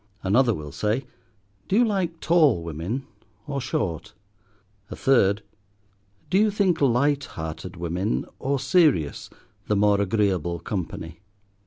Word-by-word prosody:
Another 115 +4 +3
will 75 -2 -7
say, 110 - -1 0.6
Do - - 0
you 240 +3 +5
like 185 -6 -1
tall 150 - +4
women 85 - -4 0.4
or 140 -2 -3
short? 120 - -3 0.8
A - - -6
third, 105 -6 +3 0.9
Do 190 - +4
you 215 +1 +4
think 195 -6 +1
light 140 +2 +2
hearted 80 +3 -7
women, 90 +5 -2
or 140 +1 0
serious, 135 - +2 0.4
the 105 - +1
more 100 0 +3
agreeable 95 -4 0
company? 85 -3 -5
110 Hz, 125 wpm, -24 LUFS, 90-145 Hz, 0.9 s, you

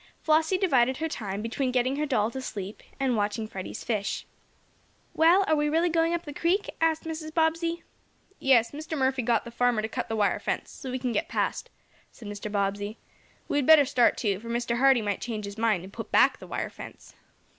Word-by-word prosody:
Flossie 320 +4 +2
divided 260 -9 +2
her 320 - -1
time 205 -8 -4
between 255 +3 -1
getting 255 +2 +1
her 300 +1 -1
doll 220 -5 +1
to 265 - -5
"sleep" 200 -5 -6 0.2
and 265 -3 +1
watching 210 +1 -1
Freddie's 190 -3 -7
fish. 205 -4 -2 0.9
"Well, 345 +5 +5
are 315 - +3
we 295 0 +1
really 330 +3 +2
going 330 +1 +2
up 340 - -4
the 295 - -7
creek?" 355 +7 0
asked 325 -1 +2
Mrs. 315 -1 -5
Bobbsey. 330 +1 0 0.6
"Yes, 240 -4 +4
Mr. 310 +2 -5
Murphy 265 -1 +1
got 235 -1 +1
the 235 - -8
farmer 240 -2 +1
to - - -1
cut 225 - -4
the 225 - -1
wire 205 -2 +1
fence, - - -3
so 265 - -8
we 255 - -2
can 250 -1 -2
get 315 +8 -1
past," - - -2 0.4
said 225 - -12
Mr. 205 0 -6
Bobbsey. 205 +1 -2 0.5
"We 290 - +1
had 275 - -1
better 315 -3 +8
start, 245 -2 +3
too, 200 -5 0
for 230 +2 -9
Mr. 235 0 -1
Hardee 265 -3 +5
might 205 -1 -2
change 220 -3 -4
his 200 +2 -8
mind, 215 -6 +1
and 190 +2 -11
put - - -7
back - - +4
the - - -11
wire - - -3
fence." - - -11
255 Hz, 210 wpm, -27 LUFS, 215-315 Hz, 0.9 s, better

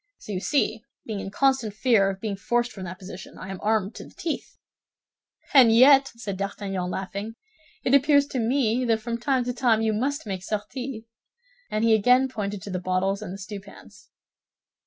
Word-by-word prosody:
So - - -9
you 185 - -2
see, 225 -1 0 0.2
being 215 -3 -4
in 195 - -5
constant 250 -2 +1
fear 215 -4 +3
of 195 -1 -5
being 210 -1 -3
forced 240 +5 0
from 190 -5 -8
that 185 +1 -7
position, 190 0 -10
I 185 - -8
am 190 - -6
armed 215 -1 +1
to - - -7
the - - -17
teeth." 325 - -5 1.0
"And 255 -5 +8
yet," 270 +4 +7
said 200 -4 -5
D'Artagnan, 195 -2 -3
laughing, 200 +4 -5 0.5
"it 255 - +1
appears 285 +1 +5
to 260 - -2
me 240 0 +1
that 225 -2 +2
from 235 +1 -4
time 260 0 +1
to 245 +1 -3
time 235 -3 +2
you 220 -1 +1
must 275 +7 -1
make 190 -3 -4
sorties." 220 +4 -5 0.7
And 215 +1 -1
he 230 -1 +5
again 250 +5 +4
pointed 205 -5 -4
to 200 - -7
the 185 - -2
bottles 185 +2 0
and 200 -4 -6
the 195 - -6
stewpans. 200 +1 -11
220 Hz, 190 wpm, -25 LUFS, 195-250 Hz, 1.0 s, And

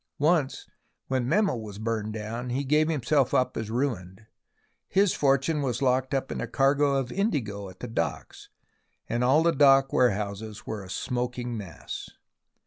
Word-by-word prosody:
Once, 150 -2 +1 0.4
when 130 -2 0
Memel 195 - +2
was 105 -2 -8
burned 110 -1 -2
down, 110 +3 -5
he 130 +3 -1
gave 150 +3 +2
himself 140 -2 +1
up 130 - +1
as 110 -1 -4
ruined. 110 -6 -3 0.6
His 195 -1 +3
fortune 140 +2 +2
was 125 -4 -1
locked 130 0 +1
up 135 0 -2
in - - -3
a - - -3
cargo 140 +1 +2
of 135 -2 -1
indigo 110 - -2
at 95 - -15
the 125 - -4
docks, 85 - -4 0.6
and 120 +1 -1
all 135 +6 +4
the 170 - +4
dock 135 -2 +5
warehouses 105 -2 0
were 110 -2 -5
a 95 - -12
smoking 125 +3 -3
mass. 95 -7 -7
125 Hz, 160 wpm, -27 LUFS, 110-140 Hz, 0.6 s, dock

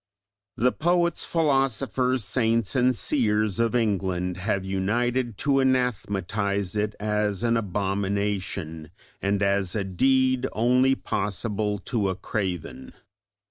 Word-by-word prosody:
The 125 +3 +3
poets, 170 0 +1
philosophers, 135 -5 +1
saints 115 -2 +1
and 125 0 +3
seers 110 -7 +1
of 115 +1 +1
England 95 -5 0
have 100 0 -1
united 115 +5 -1
to 140 -1 +3
anathematise 100 -6 0
it 105 0 -1
as 105 0 -1
an 115 0 +2
abomination, 100 -5 -2 0.3
and 100 0 0
as 100 -1 +1
a 105 - 0
deed 130 +7 +2
only 125 +4 +3
possible 105 0 -2
to 105 -5 0
a 95 - -2
craven. 90 -13 -4
105 Hz, 110 wpm, -25 LUFS, 100-125 Hz, 0.3 s, The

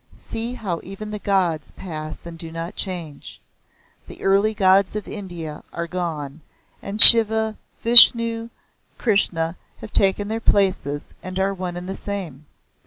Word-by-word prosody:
See 230 +2 -8
how 180 -8 -7
even 205 +3 -11
the 210 - -8
gods 180 -7 -3
pass 155 -4 -10
and 170 -1 -11
do 165 0 -11
not 165 +1 -8
change! 170 -7 -7 0.7
The - - -14
early 200 +3 0
gods 190 0 0
of 210 - -7
India 175 -7 -10
are 170 - -7
gone 160 -4 -8 0.4
and 200 +2 -9
Shiva, 220 -1 +9 0.3
Vishnu, 230 -1 +5 0.5
Krishna 175 -6 -1 0.2
have 210 - -13
taken 200 +1 -1
their 220 +1 -5
places 185 -9 -3
and 185 0 -9
are 195 +1 -2
one 180 -2 -8
and 180 +1 -10
the 190 - -6
same. 175 -9 -9
190 Hz, 145 wpm, -19 LUFS, 165-210 Hz, 0.7 s, Shiva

